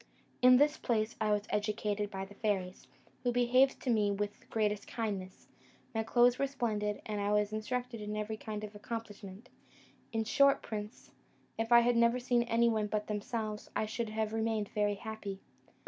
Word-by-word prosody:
In 250 Hz, 0 st, +8 dB
this 295 Hz, +3 st, +4 dB
place 220 Hz, -2 st, 0 dB
was 210 Hz, -1 st, +1 dB
I -, -, +2 dB
educated 210 Hz, 0 st, -1 dB
by 195 Hz, -1 st, -5 dB
the 200 Hz, -, -14 dB
fairies, 195 Hz, -3 st, -2 dB, 0.3 s
who 245 Hz, -, +1 dB
behaved 245 Hz, +2 st, +3 dB
to 255 Hz, -, 0 dB
me 210 Hz, -3 st, +3 dB
with 205 Hz, +1 st, -2 dB
the -, -, -24 dB
greatest 210 Hz, -2 st, -1 dB
kindness; 200 Hz, -5 st, -4 dB, 0.5 s
my 225 Hz, -, 0 dB
clothes 240 Hz, +2 st, +4 dB
were 275 Hz, -, +2 dB
splendid, 215 Hz, -6 st, -2 dB
and 210 Hz, -1 st, -3 dB
I 200 Hz, +1 st, 0 dB
was 210 Hz, 0 st, +2 dB
instructed 245 Hz, +1 st, -3 dB
in 210 Hz, 0 st, -4 dB
every 215 Hz, +1 st, -3 dB
kind 215 Hz, -1 st, -6 dB
of 210 Hz, 0 st, -7 dB
accomplishment; 210 Hz, 0 st, -7 dB, 0.6 s
in 225 Hz, -1 st, 0 dB
short, 275 Hz, +5 st, +4 dB
prince, 210 Hz, 0 st, -7 dB, 0.5 s
if 225 Hz, +1 st, -1 dB
I 235 Hz, 0 st, +9 dB
had 240 Hz, 0 st, +2 dB
never 235 Hz, +1 st, +4 dB
seen 245 Hz, -1 st, +2 dB
anyone 230 Hz, -2 st, +2 dB
but 210 Hz, 0 st, -2 dB
themselves, 215 Hz, 0 st, -4 dB
I -, -, +1 dB
should 225 Hz, +1 st, -3 dB
have 220 Hz, 0 st, -2 dB
remained 220 Hz, -2 st, -1 dB
very 205 Hz, -1 st, 0 dB
happy. 205 Hz, -2 st, -6 dB
215 Hz, 180 wpm, -32 LUFS, 210-235 Hz, 0.6 s, I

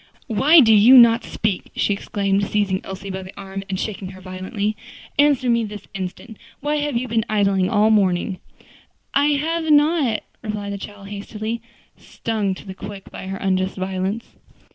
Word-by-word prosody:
"Why 295 Hz, +8 st, +6 dB
do 225 Hz, -3 st, +6 dB
you 225 Hz, +5 st, +8 dB
not 235 Hz, -1 st, +7 dB
speak?" 210 Hz, -4 st, -2 dB
she 205 Hz, -, +1 dB
exclaimed, 200 Hz, 0 st, -1 dB
seizing 200 Hz, -3 st, 0 dB
Elsie 195 Hz, +1 st, -7 dB
by 190 Hz, 0 st, -4 dB
the 190 Hz, +1 st, -11 dB
arm 195 Hz, 0 st, -6 dB
and 190 Hz, -1 st, -2 dB
shaking 200 Hz, -3 st, -4 dB
her 185 Hz, -, -12 dB
violently. 185 Hz, +3 st, -3 dB, 0.4 s
"Answer 285 Hz, -3 st, +4 dB
me 235 Hz, -1 st, +3 dB
this 210 Hz, -2 st, -8 dB
instant. 195 Hz, +3 st, -6 dB, 0.2 s
Why 295 Hz, +2 st, -1 dB
have 290 Hz, -4 st, -1 dB
you 255 Hz, +2 st, -2 dB
been 225 Hz, -1 st, +1 dB
idling 195 Hz, -3 st, +2 dB
all 210 Hz, 0 st, +3 dB
the 215 Hz, -, +6 dB
morning?" 185 Hz, -1 st, 0 dB, 0.7 s
"I 280 Hz, +1 st, +4 dB
have 325 Hz, +1 st, -1 dB
not," 295 Hz, -6 st, +3 dB, 0.2 s
replied 210 Hz, -2 st, -4 dB
the 200 Hz, -, -5 dB
child 200 Hz, 0 st, -9 dB
hastily, 215 Hz, +3 st, -5 dB, 0.4 s
stung 210 Hz, -4 st, -3 dB
to -, -, -12 dB
the 190 Hz, -, -7 dB
quick 200 Hz, 0 st, -9 dB
by 190 Hz, -, -8 dB
her 195 Hz, 0 st, -4 dB
unjust 190 Hz, 0 st, -1 dB
violence. 190 Hz, +4 st, -2 dB
205 Hz, 175 wpm, -21 LUFS, 195-230 Hz, 0.7 s, you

